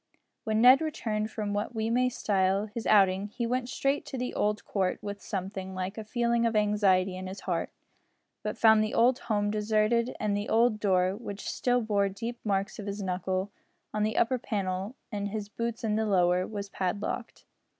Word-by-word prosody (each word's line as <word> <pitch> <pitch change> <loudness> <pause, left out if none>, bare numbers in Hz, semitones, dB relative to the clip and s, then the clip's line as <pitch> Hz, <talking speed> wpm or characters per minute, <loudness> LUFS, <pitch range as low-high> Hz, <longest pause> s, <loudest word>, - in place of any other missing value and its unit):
When 220 0 +1
Ned 255 +4 +8
returned 220 -9 -2
from 210 -2 -3
what 205 +4 -2
we 220 +1 -1
may 250 +1 +3
style 195 -3 +1
his 220 +2 -6
outing, 195 -1 +4
he 235 +3 -4
went 250 +1 -1
straight 275 +2 0
to 265 - -5
the 250 0 -3
old 210 0 0
court 190 -3 0
with 205 0 -5
something 190 -1 -5
like 185 +2 -3
a 220 - -5
feeling 235 +1 +1
of 230 - -2
anxiety 200 -3 +3
in 185 0 -6
his 190 +1 -7
heart, 175 -3 -2 0.7
but - - -4
found 220 -1 +6
the 215 - -2
old 245 +3 +4
home 205 -2 0
deserted 215 +3 +1
and 210 -1 0
the 205 +1 -3
old 225 -1 +3
door, 185 -2 +2
which 205 -2 -7
still 245 0 +1
bore 205 -3 +1
deep 230 +5 -5
marks 200 0 -1
of 210 - -6
his 200 0 -4
knuckle, 185 +1 -2 0.4
on 210 - -1
the 215 +1 0
upper 255 +2 +2
panels 195 +1 -3 0.2
and 205 -1 -2
his 205 0 -5
boots 230 +1 -4
on 215 - +1
the 220 - +1
lower, 180 -2 +3
was 205 -2 -5
padlocked. 195 +1 -3
210 Hz, 190 wpm, -29 LUFS, 195-230 Hz, 0.7 s, Ned